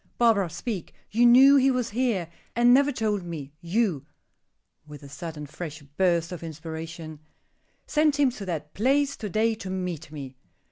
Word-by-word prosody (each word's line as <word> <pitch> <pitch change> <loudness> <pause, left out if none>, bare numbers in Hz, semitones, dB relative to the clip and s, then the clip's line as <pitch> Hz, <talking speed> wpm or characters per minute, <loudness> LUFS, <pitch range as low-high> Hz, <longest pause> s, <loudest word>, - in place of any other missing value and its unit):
"Barbara, 220 -6 +3
speak. 200 +2 -5 0.2
You 235 +3 +5
knew 270 +4 +8
he 270 0 +4
was 250 -3 -1
here, 225 -7 0 0.3
and 240 +1 +5
never 280 +2 +4
told 215 -5 -1
me; 160 -5 -7
you," 170 - 0 0.8
with 150 -1 -11
a - - -9
sudden, 155 +1 -7
fresh 155 0 -8
burst 170 +3 0
of 180 - -6
inspiration, 160 0 -7 0.7
"sent 300 -1 +2
him 275 -3 +4
to 210 -5 -8
that 150 -4 -4
place 275 +5 +2
to 210 - -5
day 220 +4 +2
to 200 -3 -7
meet 180 -5 -4
me." 135 -4 -8
185 Hz, 160 wpm, -26 LUFS, 160-240 Hz, 0.8 s, knew